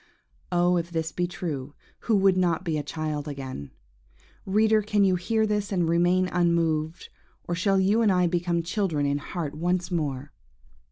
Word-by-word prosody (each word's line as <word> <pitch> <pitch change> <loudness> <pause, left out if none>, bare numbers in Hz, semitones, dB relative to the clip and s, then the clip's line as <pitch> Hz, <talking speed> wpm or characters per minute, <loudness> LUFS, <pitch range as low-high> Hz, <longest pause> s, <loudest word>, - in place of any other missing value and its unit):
Oh, 175 0 +3
if 170 0 -2
this 160 -1 -2
be 175 +3 -1
true, 150 -6 -5 0.2
who 225 - +1
would 195 -1 +4
not 180 -1 +1
be 165 -4 -1
a 150 - 0
child 150 0 -4
again? 130 - -6 0.8
Reader, 215 +2 +3
can 210 0 +1
you 190 -1 +4
hear 220 +5 +1
this 210 -1 -1
and 175 -4 +1
remain 175 +2 +3
unmoved, 165 -2 0 0.4
or 175 - -1
shall 195 +3 +2
you 200 +4 +3
and 215 -3 +4
I 180 -1 +3
become 170 0 0
children 170 -5 -1
in 140 0 0
heart 155 -1 -5
once 175 +4 -1
more? 145 -4 -2
175 Hz, 170 wpm, -26 LUFS, 155-190 Hz, 0.8 s, would